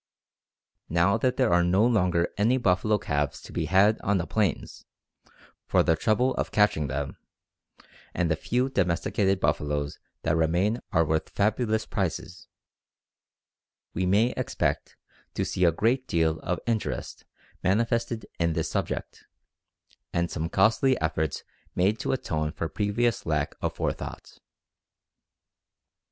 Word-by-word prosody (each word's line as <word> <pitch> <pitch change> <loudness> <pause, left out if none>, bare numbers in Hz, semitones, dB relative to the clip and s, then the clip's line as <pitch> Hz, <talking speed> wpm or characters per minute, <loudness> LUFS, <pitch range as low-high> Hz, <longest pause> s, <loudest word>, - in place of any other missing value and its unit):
Now 85 +5 +3
that 125 +2 0
there 130 -9 +3
are 85 0 +4
no 95 +5 +3
longer 90 -7 +2
any 115 +5 +2
buffalo 105 -1 +2
calves 75 -7 -2
to - - -11
be - - -1
had 100 +4 +4
on 100 0 +1
the 85 - -2
plains 100 -7 -2 0.8
for - - +3
the 80 - +3
trouble 120 +8 +1
of - - -1
catching 105 -8 +2
them, 70 +1 -4 0.9
and 85 -2 0
the - - +3
few 125 +10 0
domesticated 95 -2 +1
buffaloes 75 -1 -1 0.2
that 80 0 +1
remain 90 +8 +1
are 85 -5 +3
worth 80 0 -1
fabulous 110 +1 0
prices, 90 -2 -4 1.5
we 90 +1 -1
may 105 +6 +3
expect - - -2 0.4
to - - 0
see 90 - +1
a 85 - +5
great 125 - 0
deal 80 -1 +1
of 90 +2 -2
interest 115 -2 -3 0.4
manifested 115 +2 0
in 85 -1 +1
this - - -2
subject, - - -4 0.8
and 85 0 -1
some 80 -1 -3
costly 115 +8 +3
efforts 80 -2 -1 0.3
made 100 +5 +2
to - - -1
atone 75 -11 -1
for 85 0 -3
previous 105 +5 0
lack 75 -2 0
of - - -2
forethought. - - -5
95 Hz, 135 wpm, -27 LUFS, 80-110 Hz, 1.5 s, a